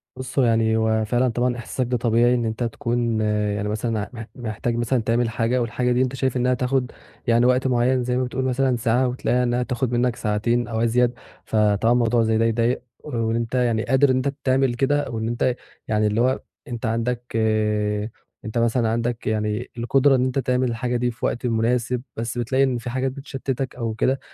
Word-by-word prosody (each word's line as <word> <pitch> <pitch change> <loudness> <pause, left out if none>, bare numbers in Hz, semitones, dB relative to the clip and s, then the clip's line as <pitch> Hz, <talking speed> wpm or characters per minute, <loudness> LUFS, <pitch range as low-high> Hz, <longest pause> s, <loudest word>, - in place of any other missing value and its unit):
بُصّ، 130 +2 -8
يعني 115 -3 +3
هو 110 -1 +1
فعلًا 120 +3 +1
طبعًا 120 +1 0
إحساسُك 125 +2 -3
ده 125 0 0
طبيعي، 120 +1 +3
إن 120 -1 0
أنت 110 +2 -2
تكون 115 -2 -1
يعني 105 -1 0
مثلًا، 110 0 -2
مح 115 -2 -7
محتاج 120 0 -2
تعمل 115 -1 +1
حاجة، 115 +3 0
والحاجة 125 +2 0
دي 125 +1 +2
أنت 130 0 0
شايف 130 -1 0
إنها 125 +1 +2
تاخُد 125 0 0 0.4
يعني 120 +1 +4
وقت 125 +1 +3
مُعيَّن، 125 0 +2
زي 125 0 0
ما 130 - +1
بتقول 130 +1 -2
مثلًا 130 0 +1
ساعة، 120 +2 +1
وتلاقيها 125 0 0
إنها 125 0 +1
تاخُد 125 -1 -2
مِنَّك 120 0 +1
ساعتين 115 +3 0
أو 115 -1 -2
أزيد. 120 +1 +2 0.3
فطبعًا 105 +1 +2
موضوع 120 -1 +2
زي 110 0 +2
ده 115 - +2
يضايِق، 115 +2 +1 0.2
وأنت 115 -3 -2
يعني 120 -3 +1
قادر 130 +3 +3
إن - - +2
أنت 130 +2 0
تعمل 130 -1 +2
كده، 140 +4 0
وإن 110 -1 -3
أنت 120 +1 0 0.3
يعني 105 -1 +2
اللِّي 105 +2 +1
هو 130 +2 +1 0.3
أنت 120 -1 -5
عندك 115 +2 -2 1.1
أنت 110 +2 -4
مثلًا 115 0 +2
عندك 115 +1 -2 0.5
القدرة 135 +4 +3
إن 130 0 +2
أنت 130 +1 0
تعمل 125 0 +1
الحاجة 120 +1 -1
دي 120 0 0
في 120 - -5
وقت 120 - -2
مناسب، 120 +1 0 0.2
بس 115 +1 -3
بتلاقي 130 +3 +1
إن 130 -2 +1
في 120 +1 -6
حاجات 130 +2 -1
بتشتِّتَك 135 -1 -4
أو 115 -3 -3
كده، 130 +4 +1
120 Hz, 190 wpm, -23 LUFS, 115-125 Hz, 1.1 s, يعني